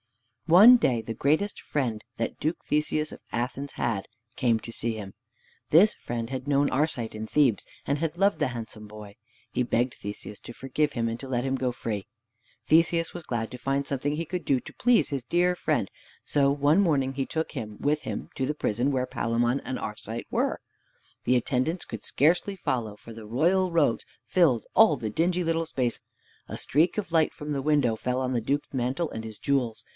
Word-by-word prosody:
One 205 +9 +9
day 125 - +1
the 115 0 -5
greatest 155 - 0
friend 120 -7 -2
that 115 - -2
Duke 160 +3 0
Theseus 150 0 0
of - - -12
Athens 125 +4 -3
had, 100 -5 -2 0.3
came 115 -3 +2
to 115 - -8
see 115 0 -2
him. 100 -3 -7 0.6
This 190 +8 +6
friend 115 -1 -5
had 130 0 -4
known 145 0 +3
Arcite 130 -6 -1
in 110 0 -4
Thebes, 130 -8 +2 0.2
and 140 +1 0
had 165 +1 -2
loved 200 +2 +3
the - - +1
handsome 110 -3 -7
boy. 105 -1 -11 0.4
He 125 - +1
begged 120 +1 +1
Theseus 105 0 -7
to 120 - -9
forgive 140 +4 -1
him, 115 -1 0
and 115 0 -2
to 135 - -7
let 125 0 0
him 135 0 0
go 130 -1 0
free. 105 -4 -4 0.6
Theseus 165 +1 +3
was 175 - -7
glad 115 -5 -3
to 125 - -6
find 135 +3 -1
something 145 +2 -1
he 165 +2 -3
could 180 +1 -4
do 135 -3 +2
to - - -12
please 245 -1 +3
his 140 -4 -3
dear 175 +6 +2
friend, - - 0 0.4
so 140 -1 +3
one 145 +6 +3
morning 140 -7 +2
he 135 0 -2
took 160 +3 -3
him 105 -1 -6
with 150 +1 +1
him - - -5
to 130 - -1
the 150 - -1
prison 125 0 0
where 130 -2 0
Palamon 120 +2 0
and 130 - -4
Arcite 110 +2 -6
were. - - 0 0.6
The 125 - +3
attendants 130 +8 -1
could 115 -2 -7
scarcely 175 +7 +2
follow, 120 - -2
for 115 - -11
the 110 -1 -10
royal 175 - +2
robes 155 -8 +2 0.2
filled 150 -11 +3
all 195 -10 +6
the 110 -2 -4
dingy 175 +6 +1
little 165 0 0
space! 125 -6 -1 0.5
A - - -5
streak 160 +9 +2
of 190 -5 -3
light 160 -2 +3
from 150 0 -5
the 140 - -1
window 140 -5 +2
fell 125 +3 -2
on 130 0 -1
the 120 - 0
Duke's 140 +6 -2
mantle 130 +6 -1
and 110 - -5
his 110 -2 -7
jewels. 125 -5 0
135 Hz, 200 wpm, -27 LUFS, 115-155 Hz, 0.6 s, One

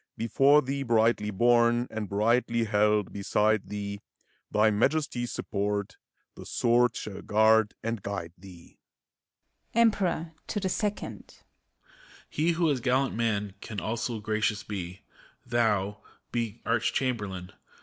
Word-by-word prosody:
Before 135 +6 +4
thee 135 +2 -3
brightly 115 -3 +2
borne, 120 +3 +3
and 110 -3 -4
brightly 115 +3 +2
held 105 -2 +1
beside 105 +1 +1
thee, 100 -1 -5
ACT - - -42
IV, - - -26
217 - - 0
Thy 110 - +5
Majesty's 130 -4 0
support, 100 0 -3 0.4
the - - -11
sword 120 +1 +2
shall 100 -2 -6
guard 110 0 +3
and 115 -2 -2
guide 95 -5 -5
thee! 90 -2 -15 1.0
EMPEROR 195 -8 +2
(to 210 - -2
the 190 -2 -1
Second). 210 +2 -4 0.8
He 165 +3 0
who 165 -2 +2
as 135 - 0
gallant 130 +1 +1
man 105 -4 -1
can 105 -3 -5
also 115 +1 -3
gracious 105 0 -1
be, 95 -3 -6 0.4
Thou, 105 -3 0
— - - -39
be 115 -1 -3
Arch 115 0 +1
Chamberlain! 105 -8 -2
110 Hz, 135 wpm, -28 LUFS, 105-125 Hz, 1.0 s, Thy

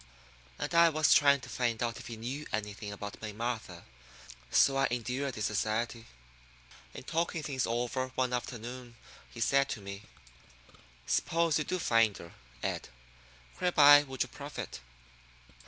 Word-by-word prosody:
And - - -4
I 170 0 +7
was 155 0 +4
trying 140 -1 +5
to - - -10
find 120 -2 -1
out 115 -1 -2
if - - -10
he 115 - -7
knew 130 +7 -5
anything 105 0 -4
about 100 0 -7
May 110 -1 -5
Martha, 110 -6 -4 0.7
so 135 - +4
I 135 0 +3
endured 125 +3 -2
his 105 - -2
society. 115 +2 -1 0.9
In - - -8
talking 165 +1 -1
things 135 -4 -1
over 120 +2 -1
one 130 -1 0
afternoon 120 0 -5 0.3
he 115 - -11
said 140 +4 +3
to 115 - -3
me: 100 0 -8 1.0
"Suppose 165 -2 +1
you 150 - -2
do 185 - -1
find 115 - +3
her, 85 - -11 0.3
Ed, - - -3 0.7
whereby 145 -5 +7
would 135 -3 -2
you - - -8
profit? - - -7
125 Hz, 150 wpm, -31 LUFS, 110-140 Hz, 1.0 s, I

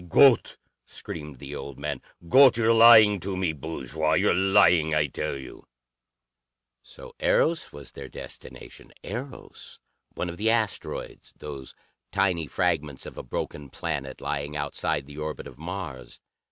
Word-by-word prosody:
"Gott!" 130 - +5 0.3
screamed 75 -3 -8
the 70 +2 -9
old 70 -1 -7
man. 70 -2 -4 0.3
"Gott, 130 +6 +7
you're 115 0 +4
lying 110 -3 +8
to 95 +1 -4
me, 90 -4 0
bourgeois! 80 +1 -3
You're 80 - +3
lying, 90 -4 +4
I 75 -1 +3
tell 70 0 -4
you!" 65 -2 -11 1.1
So - - -13
Eros 165 0 +1
was 70 -1 -10
their - - -9
destination! - - -11
Eros, 130 +6 -8 0.4
one 90 - -3
of 85 0 -6
the 110 +3 +1
asteroids, 110 -3 -2
those 70 -3 -8 0.4
tiny 85 -5 +1
fragments 80 -6 -1
of - - -9
a - - -6
broken 70 +3 -5
planet, 70 -3 -5
lying 75 +1 -3
outside 75 -1 -2
the 75 +1 -10
orbit 75 0 -5
of 65 - -12
Mars. 85 -7 -7
80 Hz, 140 wpm, -26 LUFS, 70-100 Hz, 1.1 s, lying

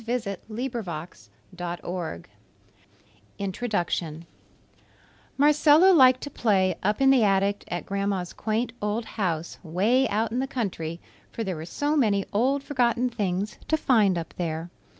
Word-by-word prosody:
INTRODUCTION 180 -6 -2 1.1
Marcella 300 +5 +6
liked 255 -5 +6
to 285 - -5
play 190 -7 +2
up 210 +6 0
in 270 0 +6
the 260 -4 +5
attic 200 0 +2
at 175 0 -4
Grandma's 195 -2 -2
quaint 225 +2 -2
old 210 +2 -1
house, 170 -7 -3
'way 210 +10 +2
out 220 +2 0
in 245 - -1
the 265 - -1
country, 175 -10 -3 0.3
for 230 - -4
there 190 -4 -3
were 155 0 -6
so 290 - -1
many 205 -8 +2
old 265 +6 +1
forgotten 250 -3 +1
things 200 -2 -2
to 315 - +2
find 215 - +3
up 165 -1 -5
there. 165 0 -3
210 Hz, 125 wpm, -26 LUFS, 185-255 Hz, 1.1 s, Marcella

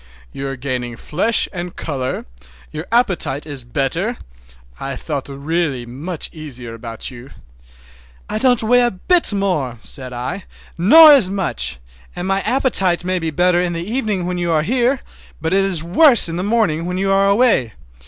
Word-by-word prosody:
You 135 - -5
are 135 - -4
gaining 125 -2 -4
flesh 210 - 0
and 175 -1 -6
color, 130 -4 -4 0.5
your 155 +3 -6
appetite 190 - 0
is 145 -4 -1
better. 150 - -2 0.6
I 135 -1 -4
feel 145 +1 -4
really 140 -2 -2
much 150 +8 -5
easier 130 -7 -7
about 115 +2 -6
you." 125 +1 -12 1.0
"I 215 - -2
don't 245 -2 +3
weigh 245 +3 +4
a 240 - +3
bit 330 - +1
more," 180 - -1
said 130 -2 -5
I, 130 +10 -5 0.3
"nor 305 - +8
as 245 -10 +4
much; 175 - -2 0.4
and 180 +1 -4
my 195 0 +1
appetite 195 -10 0
may 185 0 0
be 165 -1 -2
better 175 +2 +2
in 175 -1 -1
the 170 +2 -5
evening, 215 -8 -1
when 180 0 -3
you 175 -1 -1
are 155 -2 +2
here, 250 - +1 0.4
but 160 +3 -2
it 195 0 +3
is 185 -5 0
worse 235 - +6
in 165 - -4
the - - -2
morning 190 -6 0
when 180 0 -3
you 195 +1 0
are 195 0 +3
away." 200 - +2
175 Hz, 175 wpm, -18 LUFS, 140-200 Hz, 1.0 s, nor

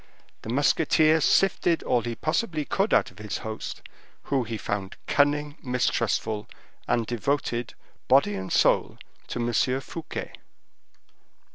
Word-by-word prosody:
The - - -8
musketeer 155 +4 +3
sifted 175 -2 +3
all 120 - +2
he 120 0 -4
possibly 155 - -1
could 195 +3 0
out - - +3
of - - -22
the 105 -3 -4
host, 110 0 -6 0.4
who 135 -2 0
he 110 0 -4
found 100 -2 -4
cunning, 145 +1 +1
mistrustful, 115 -4 -1 0.4
and 115 -1 +1
devoted, 120 0 -2 0.3
body 130 -5 +4
and 95 -1 -5
soul, - - +3 0.3
to - - -5
M. 120 +2 +1
Fouquet. 160 +3 -6
125 Hz, 125 wpm, -26 LUFS, 110-150 Hz, 0.4 s, body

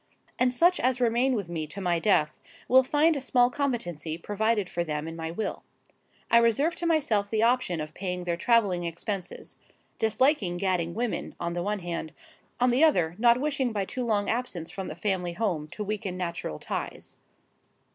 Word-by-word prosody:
And 250 0 +4
such 345 +8 +4
as 255 0 +1
remain 245 +2 +2
with 200 -6 -3
me 160 -3 -4
to 175 +6 -7
my 175 -3 +1
death, 160 -6 +2 0.3
will 260 +1 +7
find 300 +5 +3
a 280 - -2
small 250 -2 +3
competency 175 - -2
provided 210 +2 0
for 175 -1 -2
them 150 -1 -3
in 165 - -6
my 160 0 -4
will. 175 +6 -4 0.7
I 235 - +7
reserve 235 +8 +3
to 345 - -1
myself 230 -11 +1
the 220 0 +1
option 235 -8 +2
of 155 0 -5
paying 180 -1 -4
their 175 -1 -1
travelling 195 -3 +2
expenses,—disliking 205 - -2
gadding 175 -3 0
women, 235 0 -3
on 170 - -2
the 175 - -2
one 205 +2 -2
hand; 170 -2 -4 0.5
on 250 0 +4
the 255 +6 +3
other, 175 - +3
not 240 +1 +5
wishing 275 -3 0
by 205 -3 -1
too 255 +5 -4
long 210 -4 0
absence 210 -9 -2
from 190 -1 -5
the 155 - -6
family 180 -2 -1
home 175 -7 -1
to 210 - -6
weaken 200 -3 -3
natural 170 - -4
ties. - - -6
205 Hz, 180 wpm, -27 LUFS, 175-245 Hz, 0.7 s, will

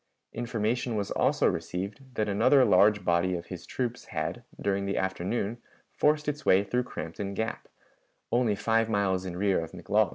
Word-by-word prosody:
Information 115 0 -1
was 100 -2 -2
also - - +2
received 100 +6 -2
that 110 - 0
another 115 +7 +5
large 105 +3 +4
body 85 +1 +2
of 85 -1 -5
his 90 - -9
troops 125 -2 -3
had, - - -4 0.2
during 100 0 0
the 100 - -1
afternoon, 95 +4 -2 0.3
forced 150 0 +2
its 150 +1 -2
way 95 +2 +5
through 125 +5 0
Crampton 100 -3 -5
Gap, 110 +3 -3 0.6
only 120 -3 +2
five 115 +2 +1
miles 95 -3 +1
in 90 -1 -5
rear 100 0 +2
of 80 - -9
McLaws. - - +1
105 Hz, 165 wpm, -28 LUFS, 95-120 Hz, 0.6 s, another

